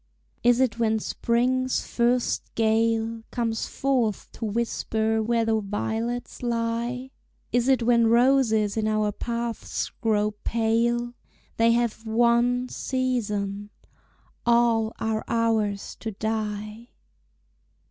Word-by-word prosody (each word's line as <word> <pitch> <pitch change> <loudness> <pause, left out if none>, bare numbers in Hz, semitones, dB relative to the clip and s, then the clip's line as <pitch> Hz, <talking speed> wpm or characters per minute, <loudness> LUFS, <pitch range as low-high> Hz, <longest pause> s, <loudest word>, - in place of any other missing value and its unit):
Is 245 0 +4
it 245 -3 +1
when 220 -1 +2
Spring's 250 +4 0
first 240 +1 +1
gale 225 0 +1
Comes 230 -2 -2
forth 250 -6 -1
to 230 - -6
whisper 220 0 0
where 230 +1 +1
the 220 -1 +2
violets 225 +4 -3
lie? 235 +2 -2 0.4
Is 245 0 +2
it 265 -3 +3
when 235 -1 +4
roses 230 -3 +3
in 220 -1 0
our 215 -1 +1
paths 235 +1 -3
grow 210 -2 +2
pale? 235 +1 +1 0.4
They 230 0 +4
have 235 -2 0
one 240 +2 +2
season 210 -7 -2 0.7
all 235 -2 +3
are 220 0 -1
ours 220 -3 0
to 225 - -4
die! 215 +1 -4
230 Hz, 105 wpm, -25 LUFS, 220-240 Hz, 0.7 s, Is